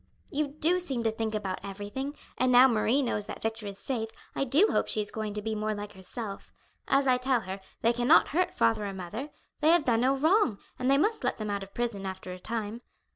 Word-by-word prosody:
"You 295 +1 0
do 310 +5 +1
seem 270 -10 -2
to 225 - +2
think 220 0 -3
about 195 -3 -3
everything; 205 +9 -5 0.2
and 255 0 +2
now 250 +1 +8
Marie 235 +3 +2
knows 210 -4 -1
that - - -6
Victor 225 -1 -2
is 200 -1 -6
safe, 225 0 -3 0.2
I - - 0
do 300 - +4
hope - - +1
she - - +1
is 210 -1 +2
going 215 -1 -4
to 210 - -3
be 220 0 -2
more 215 0 -1
like 205 0 -7
herself. 195 +2 -6 0.4
As 275 0 +3
I 255 -1 +4
tell 250 -1 +2
her, 190 0 -6 0.2
they 230 +1 +4
cannot 245 +6 +5
hurt 360 +5 +1
father 115 - +1
or 195 - -5
mother. 210 - -6 0.3
They 305 - +4
have 335 -2 +5
done 230 -2 +3
no 265 +2 +3
wrong, 315 - +3 0.2
and 255 +1 +1
they 275 - +5
must 425 +9 +1
let - - 0
them 215 -2 -3
out 200 0 -2
of 195 0 -10
prison 225 -5 -2
after 190 -1 -6
a 180 - -9
time. 225 +2 -4
230 Hz, 235 wpm, -29 LUFS, 205-270 Hz, 0.4 s, now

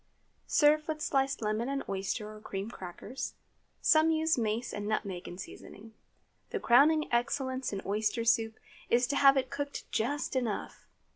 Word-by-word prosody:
Serve 305 0 +4
with 310 -1 -2
sliced 275 -4 0
lemon 215 +4 -1
and 275 0 -2
oyster 200 +2 -3
or 215 - -12
cream 200 +1 -5
crackers. 190 +8 -7 0.5
Some 315 0 +5
use 320 0 +2
mace 230 0 -1
and 205 0 -4
nutmeg 200 -4 -2
in 175 - -8
seasoning. 210 +3 -10 0.6
The 440 - -2
crowning 305 +3 +5
excellence 260 +2 0
in 195 -2 -4
oyster 215 +3 0
soup 225 -1 +2 0.3
is 245 +1 +4
to 285 - -2
have 275 -1 +6
it 260 -1 -1
cooked 285 0 -4
just 280 +6 -1
enough. 235 -5 -3
240 Hz, 155 wpm, -31 LUFS, 215-280 Hz, 0.6 s, have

